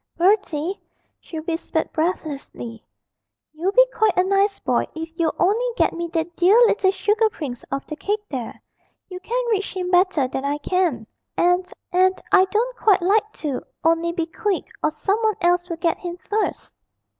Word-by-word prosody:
'Bertie,' 365 Hz, -2 st, +1 dB, 0.4 s
she 320 Hz, -, -7 dB
whispered 325 Hz, 0 st, -2 dB
breathlessly, 290 Hz, -8 st, -3 dB, 0.7 s
'you'll 340 Hz, +5 st, -1 dB
be -, -, +6 dB
quite 435 Hz, -4 st, +2 dB
a 365 Hz, -, +5 dB
nice 395 Hz, +1 st, +2 dB
boy -, -, 0 dB
if 325 Hz, 0 st, -5 dB
you'll 330 Hz, -2 st, 0 dB
only 415 Hz, +7 st, +2 dB
get -, -, +2 dB
me 340 Hz, 0 st, -3 dB
that 330 Hz, +1 st, -2 dB
dear 360 Hz, +5 st, +5 dB
little 405 Hz, -4 st, +3 dB
sugar 420 Hz, +3 st, +2 dB
prince 270 Hz, -, -6 dB
off 275 Hz, 0 st, -3 dB
the 305 Hz, -, -6 dB
cake 415 Hz, +6 st, -2 dB
there; 255 Hz, -, -6 dB, 0.5 s
you 365 Hz, -1 st, -7 dB
can 485 Hz, +6 st, -2 dB
reach 400 Hz, -2 st, -1 dB
him 360 Hz, -1 st, -2 dB
better 355 Hz, -7 st, +3 dB
than 265 Hz, +1 st, -4 dB
I 285 Hz, +1 st, -1 dB
can, 310 Hz, -7 st, 0 dB, 0.3 s
and 355 Hz, +1 st, +2 dB, 0.2 s
and 370 Hz, +1 st, +3 dB
I 380 Hz, -2 st, +6 dB
don't 460 Hz, +6 st, -1 dB
quite 395 Hz, -5 st, +3 dB
like 425 Hz, +3 st, +2 dB
to 285 Hz, -5 st, -4 dB, 0.2 s
only, 330 Hz, +1 st, +2 dB
be 340 Hz, -1 st, -2 dB
quick, 390 Hz, +3 st, -2 dB, 0.2 s
or -, -, +2 dB
some 320 Hz, +8 st, -1 dB
one 435 Hz, -2 st, +2 dB
else 350 Hz, 0 st, +2 dB
will 335 Hz, -, -3 dB
get 335 Hz, 0 st, 0 dB
him 350 Hz, -1 st, -6 dB
first.' 425 Hz, +1 st, -2 dB
360 Hz, 175 wpm, -22 LUFS, 320-395 Hz, 0.7 s, be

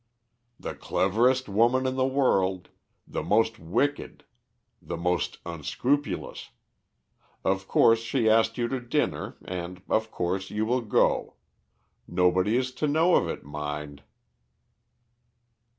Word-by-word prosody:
"The -, -, -5 dB
cleverest 125 Hz, +7 st, +1 dB
woman 120 Hz, +6 st, +2 dB
in 130 Hz, -, 0 dB
the 130 Hz, 0 st, +2 dB
world, 95 Hz, -9 st, +1 dB, 0.4 s
the -, -, -3 dB
most 110 Hz, +1 st, +1 dB
wicked, 120 Hz, -, -2 dB, 0.6 s
the -, -, -5 dB
most 90 Hz, -1 st, -1 dB
unscrupulous. 125 Hz, -, -2 dB, 0.9 s
Of 95 Hz, 0 st, 0 dB
course 115 Hz, 0 st, +5 dB
she 115 Hz, +1 st, 0 dB
asked 110 Hz, +1 st, +3 dB
you 120 Hz, -1 st, 0 dB
to 130 Hz, -, -2 dB
dinner, 120 Hz, -1 st, -2 dB
and, 90 Hz, 0 st, -6 dB
of 110 Hz, 0 st, +1 dB
course, 95 Hz, 0 st, -2 dB
you 105 Hz, +1 st, -1 dB
will 125 Hz, +3 st, +1 dB
go. 110 Hz, -3 st, +1 dB, 0.7 s
Nobody 90 Hz, +5 st, +2 dB
is 130 Hz, 0 st, -1 dB
to 150 Hz, -, +2 dB
know 160 Hz, +5 st, +3 dB
of -, -, +3 dB
it, -, -, -5 dB
mind." 75 Hz, 0 st, -6 dB
110 Hz, 120 wpm, -27 LUFS, 90-125 Hz, 0.9 s, course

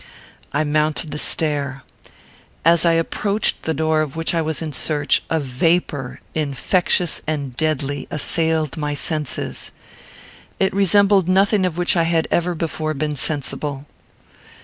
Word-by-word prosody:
I 145 Hz, +2 st, +1 dB
mounted 155 Hz, +1 st, 0 dB
the 150 Hz, -, -4 dB
stair. 140 Hz, -5 st, -1 dB, 0.8 s
As 170 Hz, 0 st, +5 dB
I 165 Hz, -, +5 dB
approached 200 Hz, +5 st, 0 dB
the 160 Hz, -, -1 dB
door 155 Hz, +1 st, +2 dB
of 150 Hz, -2 st, -3 dB
which 165 Hz, +1 st, -1 dB
I 165 Hz, -, +1 dB
was 160 Hz, -1 st, -1 dB
in 155 Hz, -2 st, -4 dB
search, 145 Hz, +1 st, +1 dB
a 160 Hz, -, +1 dB
vapour, 145 Hz, -1 st, -1 dB
infectious 160 Hz, +4 st, +1 dB
and 140 Hz, -5 st, -3 dB
deadly, 145 Hz, -2 st, -1 dB
assailed 160 Hz, 0 st, 0 dB
my 150 Hz, -1 st, -2 dB
senses. 150 Hz, -2 st, -3 dB, 0.9 s
It 190 Hz, -, +2 dB
resembled 200 Hz, -1 st, +4 dB
nothing 195 Hz, +1 st, +3 dB
of 170 Hz, -2 st, -5 dB
which 175 Hz, +1 st, +1 dB
I 165 Hz, -1 st, +3 dB
had 165 Hz, -1 st, +1 dB
ever 175 Hz, 0 st, +1 dB
before 155 Hz, -1 st, -3 dB
been 150 Hz, +1 st, -2 dB
sensible. 145 Hz, 0 st, -1 dB
155 Hz, 140 wpm, -20 LUFS, 145-170 Hz, 0.9 s, As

